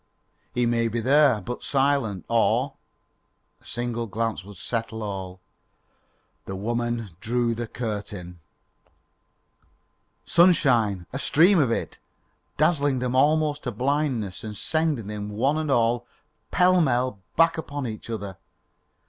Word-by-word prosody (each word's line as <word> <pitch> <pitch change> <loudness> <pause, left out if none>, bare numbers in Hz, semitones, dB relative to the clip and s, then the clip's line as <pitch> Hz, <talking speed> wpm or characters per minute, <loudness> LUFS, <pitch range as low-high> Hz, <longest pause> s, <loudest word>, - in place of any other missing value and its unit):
He 125 -1 +2
may 115 0 +1
be 115 +1 -2
there 135 -1 +4
but 120 +6 -6
silent, 135 - 0
or - - +2 0.9
A - - -25
single 120 -1 -3
glance 110 -1 -2
would 100 0 -12
settle 110 +1 -3
all. 95 -2 -6 1.0
The 95 - -5
woman 120 +1 -2
drew 120 +2 0
the 115 0 -4
curtain. 105 -7 -5 1.9
Sunshine! 125 - +3
A 135 - -3
stream 175 +7 +5
of 135 -5 +3
it, 115 - -3 0.6
dazzling 145 -5 +2
them 125 0 -2
almost 150 +2 +3
to 125 - -3
blindness 125 -4 -1
and 105 -1 -6
sending 155 -4 0
them, 105 0 -5
one 135 +9 +1
and 155 -1 -2
all, 120 -1 +2 0.4
pellmell 135 - +3 0.2
back 165 0 +4
upon 145 -3 -5
each 110 -1 -6
other! 100 -5 -5
120 Hz, 125 wpm, -25 LUFS, 105-145 Hz, 1.9 s, stream